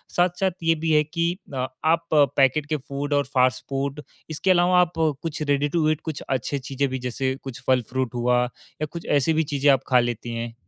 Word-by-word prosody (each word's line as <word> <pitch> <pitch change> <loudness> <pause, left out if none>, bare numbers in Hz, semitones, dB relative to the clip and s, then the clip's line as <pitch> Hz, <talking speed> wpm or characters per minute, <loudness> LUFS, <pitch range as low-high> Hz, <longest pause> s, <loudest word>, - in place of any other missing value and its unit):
साथ-साथ 180 +2 +2
ये 165 0 +3
भी 160 +1 -1
है 150 0 +5
कि 170 +2 -1 0.2
अ, 130 0 -1 0.2
आप 165 +1 +2
पैकेट 140 0 +3
के 155 - +1
फूड 140 +1 -4
और 145 0 +2
फास्ट 130 0 +2
फूड 140 +1 -2 0.3
इसके 160 +5 +1
अलावा 180 0 +4
आप 175 -1 0 0.3
कुछ 165 -2 -4
रेडी 145 -1 +1
टू 155 0 +1
ईट 155 -1 0
कुछ 155 -3 -4
अच्छी 135 +2 -1
चीज़ें 135 +1 -2
भी, 130 0 -3
जैसे 130 +1 -2
कुछ 130 -2 -8
फल 130 -1 +4
फ्रूट 130 -2 -1
हुआ 125 0 +2 0.4
या - - +1
कुछ 170 - -7
ऐसी 145 +2 +2
भी 160 +1 +2
चीज़ें 145 -1 +1
आप 135 -1 +2
खा 125 -1 +5
लेती 120 -1 -2
हैं? 115 0 -4
140 Hz, 215 wpm, -24 LUFS, 130-160 Hz, 0.4 s, है